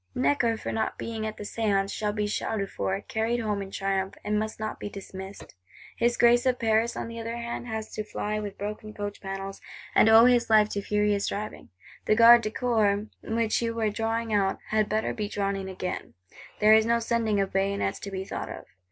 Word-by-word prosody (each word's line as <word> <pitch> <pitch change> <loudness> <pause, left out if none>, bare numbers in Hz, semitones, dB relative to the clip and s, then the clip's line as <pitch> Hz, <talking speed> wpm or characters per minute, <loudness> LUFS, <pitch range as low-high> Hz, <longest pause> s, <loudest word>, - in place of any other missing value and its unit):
Necker, 145 - +2
for - - -4
not 220 - -2
being 220 -1 -4
at 215 - -6
the - - -6
Séance, 200 -2 0
shall 210 -1 -1
be 210 0 -1
shouted 205 -1 -2
for, 195 +1 -2
carried 225 +3 -1
home 210 -3 -1
in 195 - -6
triumph; 195 -1 -2
and 210 0 0
must 220 0 -4
not 215 0 -4
be - - -5
dismissed. 195 0 -9 0.4
His 240 +1 +1
Grace 240 +1 +5
of 250 -1 +2
Paris, 225 +1 +1
on - - -3
the 230 0 -7
other 230 +1 -4
hand, 235 +1 -5
has 220 -1 -4
to 215 - -4
fly 210 0 -3
with 205 -2 -6
broken 210 +1 -6
coach 205 0 -5
panels, 195 0 -6 0.3
and 220 - +6
owe 225 +1 +8
his 245 -2 +4
life 215 -1 +5
to 200 - -2
furious 210 0 +1
driving. 210 +1 -5 0.4
The 215 - +3
Gardes 235 +1 +8
du - - 0
Corps 240 +1 0 0.2
(Body 210 +2 -7
Guards), 225 - -4
which 230 0 +1
you 230 -1 -1
were 220 -2 0
drawing 225 +1 -2
out, 195 -2 +2
had 215 -1 +1
better 215 +1 0
be 210 -2 -3
drawn 200 -1 -1
in 190 -1 -5
again. 185 -1 -5 0.4
There 215 +1 +6
is 220 0 +5
no 235 0 +3
sending 225 -2 0
of 195 -1 -1
bayonets 195 +1 0
to 200 - -6
be 190 -1 -4
thought - - -5
of. - - -8
215 Hz, 220 wpm, -27 LUFS, 200-225 Hz, 0.4 s, owe